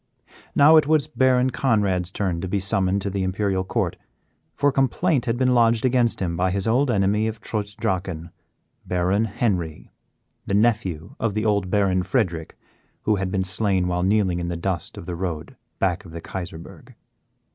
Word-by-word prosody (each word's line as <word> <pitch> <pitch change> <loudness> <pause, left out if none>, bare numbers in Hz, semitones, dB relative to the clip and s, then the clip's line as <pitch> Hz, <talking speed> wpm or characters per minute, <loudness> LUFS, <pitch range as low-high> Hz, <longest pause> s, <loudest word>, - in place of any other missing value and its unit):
Now 155 +3 +7
it 155 - +4
was 155 -2 +3
Baron 130 0 +2
Conrad's 100 -9 +1
turn 90 -5 -2
to 95 - -3
be 100 +2 0
summoned 95 0 +1
to 100 - -2
the 100 0 -2
Imperial 95 0 0
Court, - - -2 0.6
for 145 0 +2
complaint 135 +2 +1
had 120 -1 0
been 130 0 +2
lodged 115 -1 +3
against 125 -2 +2
him 85 -3 -2
by 90 +2 +1
his 95 +3 -1
old 130 +5 +2
enemy 105 0 +2
of 110 0 -4
Trutz 105 0 -4
Drachen 90 -7 -3 0.5
Baron 90 +4 +1
Henry 95 -7 -2 0.6
the 100 - 0
nephew 100 -6 0
of 110 -3 -1
the 110 +1 -1
old 100 -3 +1
Baron 95 -2 +2
Frederick 90 -6 -2 0.5
who 105 -1 +2
had 95 -1 -2
been 95 -1 0
slain 95 -1 0
while 90 0 -1
kneeling 95 -2 +2
in 85 - -3
the 85 -1 -3
dust 85 -1 -3
of - - -8
the 90 - -4
road 85 -3 -5 0.2
back 95 -1 0
of 85 -4 -13
the 85 - -5
Kaiserburg. 85 -1 -8
100 Hz, 180 wpm, -23 LUFS, 90-115 Hz, 0.6 s, Now